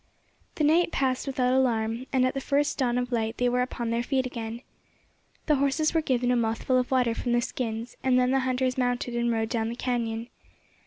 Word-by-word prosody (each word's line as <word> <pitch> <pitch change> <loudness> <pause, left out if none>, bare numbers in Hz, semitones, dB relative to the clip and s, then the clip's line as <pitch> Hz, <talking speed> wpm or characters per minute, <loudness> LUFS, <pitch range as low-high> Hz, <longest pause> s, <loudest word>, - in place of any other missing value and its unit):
The 310 - -1
night 335 +3 +3
passed 260 0 0
without 255 -2 +1
alarm, 235 -1 +1
and 260 -2 +3
at 255 - 0
the 270 - -3
first 285 +2 0
dawn 245 -2 +1
of 250 0 -2
light 225 -1 -1
they 245 - +2
were 250 +1 +1
upon 240 -2 -3
their 235 +1 +1
feet 260 +1 0
again. 235 -1 -6 0.8
The 300 -2 +3
horses 280 +3 +1
were 325 - +2
given 250 -4 +1
a - - +3
mouthful 235 +2 +1
of 250 - -2
water 250 -3 +2
from 240 +1 -2
the 240 - +3
skins, 230 -1 -4
and 260 -1 +3
then 250 0 +3
the 270 - +3
hunters 255 0 0
mounted 245 -1 -1
and 235 0 +1
rode 225 -1 -1
down 225 -1 -1
the 235 - -4
cañon. 235 -2 -2
250 Hz, 215 wpm, -27 LUFS, 235-260 Hz, 0.8 s, night